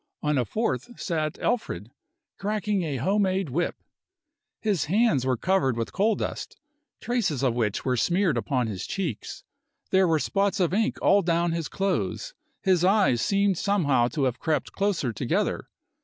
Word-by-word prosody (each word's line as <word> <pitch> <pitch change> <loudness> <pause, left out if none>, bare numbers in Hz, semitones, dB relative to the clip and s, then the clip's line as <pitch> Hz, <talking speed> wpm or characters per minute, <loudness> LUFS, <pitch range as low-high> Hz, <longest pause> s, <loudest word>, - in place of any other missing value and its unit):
On 150 0 +1
a 125 - +1
fourth 220 - -2
sat 155 -2 -2
Alfred, 110 - -2 0.5
cracking 210 -1 -1
a 155 -5 -2
home 195 - +1
made 190 -3 0
whip. 170 +6 0 0.8
His 205 -9 0
hands 170 - +2
were 130 -2 +1
covered 135 -7 +1
with 115 - -3
coal 210 +3 +2
dust, - - -5 0.4
traces 215 - -1
of 125 -3 +2
which 110 -4 -1
were 130 -1 +2
smeared 175 - +2
upon 130 -5 0
his 105 -5 -4
cheeks. 170 - -4 0.5
There 190 -1 +4
were 165 -1 +3
spots 195 +8 0
of 180 -1 +1
ink 220 +3 +1
all 200 - +5
down 170 -1 +1
his 165 -2 -2
clothes, 195 - -2 0.3
his 185 -4 +3
eyes 190 - +3
seemed 200 - +2
somehow 145 - +2
to 145 +2 -2
have 130 -2 0
crept 155 -2 -1
closer 195 - 0
together. - - -1
175 Hz, 160 wpm, -26 LUFS, 135-200 Hz, 0.8 s, all